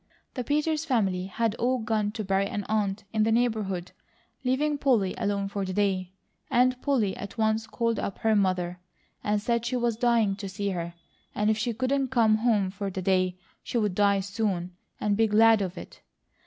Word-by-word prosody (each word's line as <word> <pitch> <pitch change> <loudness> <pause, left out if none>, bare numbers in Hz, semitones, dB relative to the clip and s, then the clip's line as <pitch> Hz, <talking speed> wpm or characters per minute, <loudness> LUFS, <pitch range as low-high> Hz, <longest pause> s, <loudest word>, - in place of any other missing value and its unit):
The 250 - -3
Peters 300 +3 0
family 195 - 0
had 225 +2 0
all 255 +2 +2
gone 215 -2 -1
to 220 -1 -4
bury 195 0 +1
an 205 0 -3
aunt 210 -2 -1
in 215 - +1
the 220 +1 +3
neighbourhood, 215 -6 0 0.5
leaving 285 +3 +1
Polly 230 -10 +2
alone 200 -1 -1
for 200 0 -3
the 185 -1 -3
day; 190 -2 0 0.4
and 250 +1 +3
Polly 235 -9 +1
at 200 +3 -8
once 220 0 +1
called 230 0 -1
up 195 - -3
her 220 -1 +2
mother, 180 -3 0 0.4
and 210 0 +1
said 235 +2 0
she 240 +2 -2
was 235 -2 0
dying 230 -4 +2
to 200 -1 -6
see 200 +1 -3
her, 170 -2 -4 0.4
and 210 +1 +2
if 215 - 0
she 240 +2 0
couldn't 260 +4 0
come 230 -4 +3
home 215 -5 +2
for 200 0 -4
the 190 0 -5
day, 185 -1 +1 0.2
she - - -3
would 210 -4 +1
die 200 0 +3
soon, 190 -3 -2 0.2
and 205 -1 +1
be 225 0 +4
glad 220 0 +5
of 185 -1 -3
it. - - -10
215 Hz, 195 wpm, -27 LUFS, 195-235 Hz, 0.5 s, glad